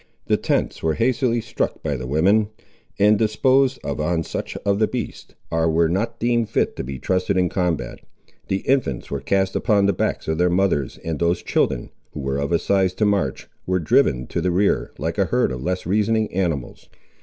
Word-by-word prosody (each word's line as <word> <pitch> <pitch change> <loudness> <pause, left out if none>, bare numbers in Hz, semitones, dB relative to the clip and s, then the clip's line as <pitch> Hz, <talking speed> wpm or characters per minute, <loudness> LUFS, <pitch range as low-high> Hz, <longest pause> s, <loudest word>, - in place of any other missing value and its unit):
The - - +2
tents - - -1
were 80 -1 0
hastily 120 - +1
struck - - -3
by 75 -3 -1
the 65 -1 -5
women, 100 +10 +3 0.5
and 105 +1 +4
disposed 130 +4 +3
of 70 - -3
on 80 +1 0
such - - -5
of 100 0 +2
the 110 - +3
beasts 125 -4 -6 0.2
as 80 0 +1
were 80 +1 +3
not 100 +8 -1
deemed 120 -1 +1
fit - - 0
to - - -3
be 65 +1 -6
trusted 95 +6 0
in 90 -1 +2
combat. 85 -10 -2 0.5
The 95 - -2
infants 130 - 0
were 70 - -2
cast 95 +3 0
upon 105 -4 +2
the 100 - +3
backs - - -2
of 80 +1 -1
their 90 0 +3
mothers, 90 -7 +1
and 80 -2 -2
those 85 +1 +1
children, - - 0 0.2
who - - -6
were 70 0 -2
of 70 +3 -2
a 85 - +4
size 95 0 +1
to 105 - +1
march, 100 -10 0 0.2
were 90 0 +2
driven 65 -6 +2
to - - -2
the 90 - +1
rear, 95 +3 +1
like - - -3
a - - +4
herd - - +1
of 65 -1 -5
less 90 +6 -2
reasoning 110 +3 +1
animals. 85 -9 -3
90 Hz, 200 wpm, -22 LUFS, 80-105 Hz, 0.5 s, and